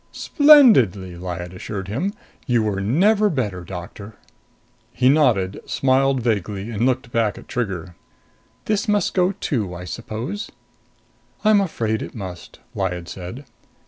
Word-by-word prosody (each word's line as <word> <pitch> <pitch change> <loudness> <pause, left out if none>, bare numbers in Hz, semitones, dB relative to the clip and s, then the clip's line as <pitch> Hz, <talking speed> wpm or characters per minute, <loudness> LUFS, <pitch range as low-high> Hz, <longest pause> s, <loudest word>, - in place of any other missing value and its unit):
"Splendidly," 170 - +5
Lyad 90 0 -6
assured 95 +1 -6
him. 170 - -2 0.3
"You 120 -3 +2
were 100 -2 -1
never 200 - +3
better, 105 - -2
Doctor." 95 +4 -9 0.8
He 125 +1 +2
nodded, 115 -10 +2
smiled 135 -1 +2
vaguely 105 -1 -2
and 115 +3 0
looked 130 -2 -1
back 115 -3 0
at - - -12
Trigger. 95 -8 -4 0.7
"This 210 -1 0
must 210 -1 +1
go, 180 +1 +2
too, 110 - -3
I 90 +1 -8
suppose?" 120 - -5 1.0
"I'm 215 -1 +5
afraid 110 - -2
it - - -7
must," 95 -5 -8
Lyad 90 -3 -3
said. 95 +10 -8
115 Hz, 130 wpm, -21 LUFS, 95-145 Hz, 1.0 s, Splendidly